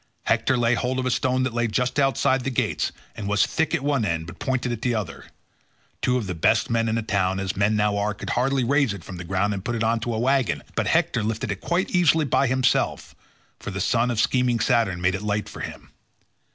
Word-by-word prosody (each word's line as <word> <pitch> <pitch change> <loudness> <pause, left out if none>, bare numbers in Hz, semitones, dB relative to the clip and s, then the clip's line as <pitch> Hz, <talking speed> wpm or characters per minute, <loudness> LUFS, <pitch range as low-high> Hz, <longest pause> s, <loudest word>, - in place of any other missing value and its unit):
Hector 130 - +1
laid 120 0 +2
hold 130 +1 -1
of 130 - -1
a 130 - +1
stone 130 +1 +1
that 130 -2 -2
lay 120 0 +1
just 125 +5 -1
outside 135 -1 +2
the 135 - -1
gates 125 - -1 0.2
and 105 - -5
was 105 -1 +3
thick 160 - 0
at 135 - -3
one 140 -4 +1
end 85 -5 -1
but 80 - -11
pointed 130 -2 -1
at 115 -2 -4
the 125 -2 0
other; 100 -6 -5 0.8
two 125 0 +2
of 120 - -3
the 95 - -3
best 80 - +2
men 115 0 +1
in 110 - 0
a 115 - -2
town, 95 -3 0
as 95 -1 -3
men 100 +2 +2
now 105 -1 +1
are, 105 +1 -1
could - - -6
hardly 135 +1 +1
raise 135 -3 +2
it 90 - -11
from 90 - -8
the 90 - -6
ground 95 +4 0
and 95 -2 -5
put 120 +2 -2
it 115 - -1
on 115 +1 +1
to 115 0 -3
a - - -2
waggon, 130 +1 +1
but - - -1
Hector 115 - +2
lifted 110 +4 -2
it - - -5
quite 175 +2 -1
easily 165 -3 +3
by 140 0 +2
himself, 130 +1 0 0.5
for - - -6
the 95 - -4
son 120 +5 +1
of 120 -3 -1
scheming 125 -1 +2
Saturn 110 -9 +1
made 90 +1 +2
it 95 - -3
light 105 0 -1
for - - -10
him. - - -8
115 Hz, 245 wpm, -24 LUFS, 105-130 Hz, 0.8 s, was